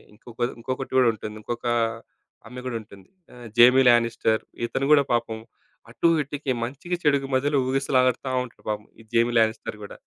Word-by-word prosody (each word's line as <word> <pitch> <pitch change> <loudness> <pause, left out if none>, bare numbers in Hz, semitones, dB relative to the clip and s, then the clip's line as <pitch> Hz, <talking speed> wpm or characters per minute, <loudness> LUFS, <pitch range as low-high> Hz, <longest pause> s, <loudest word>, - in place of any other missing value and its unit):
ఇంకొక 115 +2 -15 0.2
ఇంకొకటి 130 +3 -5
కూడా 125 - +5
ఉంటుంది. 105 0 -8
ఇంకొక 120 +2 -5 0.8
ఆమె 125 +2 -9
గూడా 125 -2 -2
ఉంటుంది. 100 -2 -16 0.3
ఆహ్, 120 -1 -10
'జైమీ 125 +2 +7
లానిస్టర్'. 115 -2 +2 0.2
ఇతను 135 +3 -2
కూడా 145 - +6
పాపం 115 -2 -1 0.5
అటూ, - - +1 0.2
ఇటూకి 140 0 -4
మంచికి, 140 +9 -4
చెడుకి 140 -2 +2
మధ్యలో 140 +2 +1
ఊగిసలాడతా 130 -1 +1
ఉంటాడు 120 - -18
పాపం. 105 0 -3
ఈ - - -16
'జైమీ 120 +1 +3
లానిస్టర్' 110 -1 -1
కూడా. 100 - -10
120 Hz, 155 wpm, -24 LUFS, 115-135 Hz, 0.8 s, జైమీ